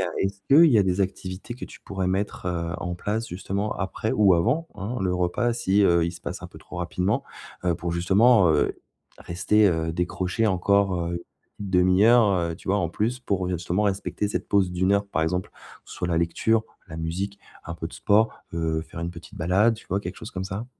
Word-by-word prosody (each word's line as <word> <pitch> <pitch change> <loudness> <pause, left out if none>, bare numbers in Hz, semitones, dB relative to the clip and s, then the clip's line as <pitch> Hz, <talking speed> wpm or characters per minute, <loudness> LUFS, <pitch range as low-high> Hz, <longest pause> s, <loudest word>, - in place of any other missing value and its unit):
heu, - - +1 0.2
est-ce 100 0 -2
qu'il 155 +3 +7
y 115 - +5
a 100 - +4
des 95 +1 0
activités 95 +3 -4
que 125 - -7
tu - - -13
pourrais 95 -2 -3
mettre, 95 0 -2
heu, 85 -1 -2
en 90 0 -4
place 105 +6 -3
justement 100 +3 -3
après 100 +3 -2
ou 100 -4 +5
avant, 155 - +1
hein, 115 +6 -4
le 95 -1 0
repas 90 +7 0
si, 105 -3 +2
heu, 85 -3 +4
il 85 - -3
se 85 - -12
passe - - -6
un - - -4
peu - - -14
trop - - -11
rapidement, 90 +3 -1 0.4
heu, 90 -2 +2
pour 85 +2 -4
justement, 95 +4 +4
heu, 75 -2 +2 0.5
rester, 105 +5 +2
heu, 80 -3 0
décroché 90 +5 -1
encore, 100 0 +2 0.2
heu, 85 0 -5 0.4
1/2, 100 +5 +4 0.2
heu, - - -6
tu - - -13
vois, 100 - +3
en 85 -4 0
plus, 110 +8 -1
pour, 100 -7 -1
heu, - - -2
justement 90 +3 -1
respecter 100 +1 -1
cette - - -3
pause 100 -3 +2
d'1 95 +2 +1
heure? 100 0 +2
Par 80 - -1
exemple: 90 +3 -1
que - - -18
ce - - -8
soit 90 - -2
la 85 -2 +1
lecture, 110 +7 +1 0.3
la 80 - -8
musique, 95 +5 -3 0.3
un 85 - -6
peu 80 -1 -5
de - - -12
sport, 110 +2 +3 0.2
heu, 80 -1 -1
faire 85 - -9
une 85 +1 -3
petite 85 -1 -12
balade, 95 +8 +3
tu - - -15
vois? 95 - 0
Quelque 90 -1 -6
chose 110 - -9
comme 95 0 -4
ça. 95 +5 -5
95 Hz, 220 wpm, -25 LUFS, 85-105 Hz, 0.5 s, qu'il